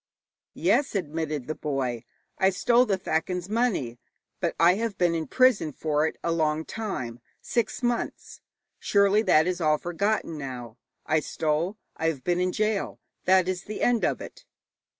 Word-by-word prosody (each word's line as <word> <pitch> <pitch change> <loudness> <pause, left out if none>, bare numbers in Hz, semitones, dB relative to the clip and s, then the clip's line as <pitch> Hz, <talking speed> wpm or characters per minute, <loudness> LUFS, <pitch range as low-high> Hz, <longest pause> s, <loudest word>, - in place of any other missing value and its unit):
'Yes,' 280 - +2
admitted 155 -5 -2
the 155 - -3
boy, 130 -6 -3 0.3
'I 190 - +5
stole 240 +6 +3
the 195 - +1
thakin's 180 0 -2
money, 205 - 0 0.4
but - - -1
I 170 +2 +6
have 215 0 -2
been 175 -2 +2
in 160 -2 -2
prison 255 - +3
for 150 +1 0
it - - -6
a 170 - 0
long 155 -1 0
time 130 - -4 0.2
six 235 +1 -2
months. 240 -1 -2 0.4
Surely 200 +1 +3
that 160 -7 +4
is 180 0 -2
all 155 -1 +3
forgotten 175 -1 -1
now. 125 -4 -7 0.3
I 155 +1 +2
stole; 160 +6 -1 0.2
I 160 - 0
have 145 -6 -2
been 175 +3 +1
in 180 0 +1
gaol 215 +2 -1 0.3
that 185 -1 +4
is 185 0 -3
the 215 - -4
end 245 -2 +2
of - - 0
it.' - - -10
175 Hz, 165 wpm, -26 LUFS, 155-200 Hz, 0.4 s, I